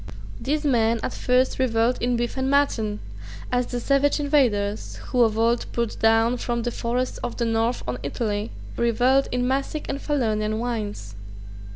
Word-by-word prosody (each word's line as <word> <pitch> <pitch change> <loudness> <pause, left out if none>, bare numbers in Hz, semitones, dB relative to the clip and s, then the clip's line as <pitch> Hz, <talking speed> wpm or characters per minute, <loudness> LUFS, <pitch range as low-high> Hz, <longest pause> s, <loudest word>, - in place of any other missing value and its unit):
These 300 +3 -1
men 230 -4 +2
at - - -2
first 255 +1 +1
revelled 235 -1 +2
in 245 0 +1
beef 240 0 -2
and 265 0 -1
mutton, 225 -7 +1 0.5
as 250 -1 +1
the 245 - -3
savage 275 +4 +2
invaders, 235 -9 +1
who 250 - +2
of 220 -2 +3
old 230 +1 +1
poured 235 -2 -2
down 225 +2 +3
from 235 -1 -2
the 240 - -1
forests 245 +2 -2
of 245 - -5
the 235 - 0
north 225 +2 0
on 125 0 -3
Italy, 210 +7 -2 0.3
revelled 245 +4 +3
in 250 0 0
Massic 275 +3 -1
and 275 - -3
Falernian 215 -7 0
wines. 215 - -4
240 Hz, 165 wpm, -24 LUFS, 225-260 Hz, 0.5 s, of